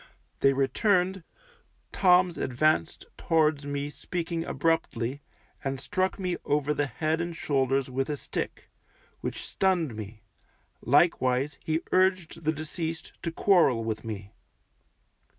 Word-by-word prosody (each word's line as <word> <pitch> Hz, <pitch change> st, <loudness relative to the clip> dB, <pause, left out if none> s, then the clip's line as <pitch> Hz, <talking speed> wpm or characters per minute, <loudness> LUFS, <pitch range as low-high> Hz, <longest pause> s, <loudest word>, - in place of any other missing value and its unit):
They 135 Hz, -, +5 dB
returned, 180 Hz, +6 st, +1 dB, 0.7 s
Toms 180 Hz, -2 st, +4 dB
advanced 125 Hz, -, +1 dB
towards 155 Hz, -3 st, +2 dB
me 145 Hz, 0 st, -3 dB
speaking 170 Hz, 0 st, -3 dB
abruptly, 140 Hz, -4 st, 0 dB, 0.4 s
and 135 Hz, -1 st, -2 dB
struck 185 Hz, +5 st, -1 dB
me 180 Hz, -3 st, -2 dB
over 145 Hz, 0 st, +1 dB
the 145 Hz, -1 st, 0 dB
head 155 Hz, +5 st, -1 dB
and 170 Hz, 0 st, -4 dB
shoulders 135 Hz, -3 st, +1 dB
with 135 Hz, +2 st, -2 dB
a 150 Hz, -, -1 dB
stick, -, -, -5 dB, 0.5 s
which -, -, -4 dB
stunned 175 Hz, -, +1 dB
me; 110 Hz, +1 st, -8 dB, 0.6 s
likewise 135 Hz, -1 st, +2 dB
he 160 Hz, +1 st, 0 dB
urged 185 Hz, -3 st, +1 dB
the 155 Hz, -, +3 dB
deceased 160 Hz, +1 st, -5 dB
to 165 Hz, -, -2 dB
quarrel 165 Hz, -, +4 dB
with 110 Hz, -1 st, -3 dB
me. 105 Hz, -3 st, -7 dB
155 Hz, 120 wpm, -28 LUFS, 135-170 Hz, 0.7 s, They